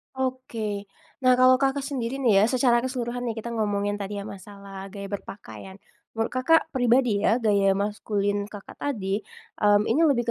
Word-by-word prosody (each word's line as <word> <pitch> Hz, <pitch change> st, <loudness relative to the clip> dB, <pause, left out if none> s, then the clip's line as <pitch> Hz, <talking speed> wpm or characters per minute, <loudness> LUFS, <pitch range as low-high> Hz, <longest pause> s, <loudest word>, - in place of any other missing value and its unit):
Oke. 235 Hz, -6 st, -3 dB, 0.3 s
Nah, 255 Hz, -2 st, +5 dB
kalau 255 Hz, 0 st, +6 dB
Kakak 275 Hz, 0 st, +1 dB
sendiri 265 Hz, -3 st, -3 dB
nih 215 Hz, -6 st, +5 dB
ya, -, -, +5 dB
secara 245 Hz, -1 st, +3 dB
keseluruhan 245 Hz, -1 st, -3 dB
nih, 225 Hz, -, -2 dB
kita 235 Hz, +1 st, -5 dB
ngomongin 205 Hz, -2 st, -1 dB
tadi 200 Hz, +1 st, -5 dB
ya, 200 Hz, -, -4 dB
masalah 200 Hz, -1 st, -9 dB
gaya 200 Hz, 0 st, -8 dB
berpakaian. 195 Hz, -1 st, -8 dB, 0.4 s
Menurut 225 Hz, 0 st, -1 dB
Kakak 320 Hz, +5 st, +2 dB
pribadi 245 Hz, -4 st, +2 dB
ya, 215 Hz, +2 st, +3 dB
gaya 200 Hz, -5 st, +2 dB
maskulin 205 Hz, 0 st, -1 dB
Kakak 205 Hz, -1 st, -11 dB
tadi, 205 Hz, -8 st, -2 dB, 0.4 s
mmm, 205 Hz, 0 st, +4 dB
ini 230 Hz, +8 st, +1 dB
lebih 255 Hz, -5 st, +2 dB
220 Hz, 165 wpm, -25 LUFS, 200-255 Hz, 0.4 s, kalau